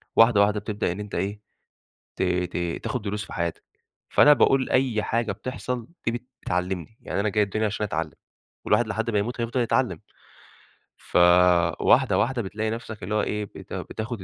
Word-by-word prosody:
واحدة 115 -2 +6
واحدة 105 +1 +3
بتبدأ 105 -2 -2
إن 90 - -6
أنت 105 -1 -6
إيه 100 +2 -2 0.8
ت - - -2
ت 90 -1 0 0.3
تاخد 125 - -2
دروس 105 0 -3
في - - -11
حياتك، 85 -2 -3 0.4
فأنا 150 - +6
باقول 135 -2 +3
أي 125 -5 +2
حاجة 115 0 -1
بتحصل 125 -2 -5 0.2
دي 120 +1 -2 0.2
بتعلمني، 90 +3 -3
يعني - - -3
أنا 105 - +1
جاي 105 +1 +2
الدنيا 110 +2 -1
عشان 105 0 -2
أتعلم، 105 - -3 0.5
والواحد 120 - +3
لحد 115 +1 -2
ما 105 - +2
يموت 120 +4 -3
هيفضل 120 +2 -1
يتعلم، 120 -6 +1 1.0
فواحدة 90 -1 +4
واحدة 125 0 +1
بتلاقي 110 +2 -3
نفْسك 110 -3 -6
اللي 105 +4 -2
هو 105 - +3
إيه 105 0 -2
بت - - -12
بتاخد 110 -2 -5
105 Hz, 170 wpm, -25 LUFS, 95-115 Hz, 1.0 s, واحدة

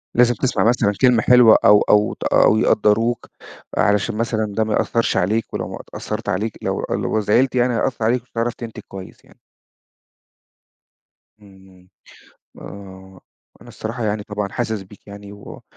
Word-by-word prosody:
لازم 120 0 +4
تسمع 130 - -1
مثلًا 115 -3 +2
كلمة 125 -4 +4
حلوة 125 -2 +6
أو 105 0 +6
أو 105 0 +2
ت - - -9
أو 110 - +3
يقدّروك، 115 +3 +1 0.5
علشان 105 0 +1
مثلًا 110 -2 -2
ده 110 - +3
ما 110 -1 -2
يأثرش 115 -2 0
عليك. 105 +5 -1
ولو - - -3
ما - - -7 0.2
تأثرت - - -5
عليك 105 +3 -2
لو - - -3
لو 110 - -1
زعلت 120 +6 +1
يعني، 125 0 +2
هيأثر 115 -1 -1
عليك، 120 +1 +1
مش - - -36
هتعرف 115 +1 -2
تنتج 115 -2 -9
كويس 95 -1 -11
يعني. - - -23 2.0
إمم، 95 -2 -19
امم، 90 -1 -21 0.7
آه، 95 -1 -12 0.4
أنا - - -15
الصراحة 115 +1 -6
يعني 105 0 -2
طبعًا 105 -1 -4
حاسس 110 -4 -3
بيك 100 +2 -18
يعني، 100 0 -11
وح 100 0 -12
110 Hz, 160 wpm, -20 LUFS, 100-115 Hz, 2.0 s, حلوة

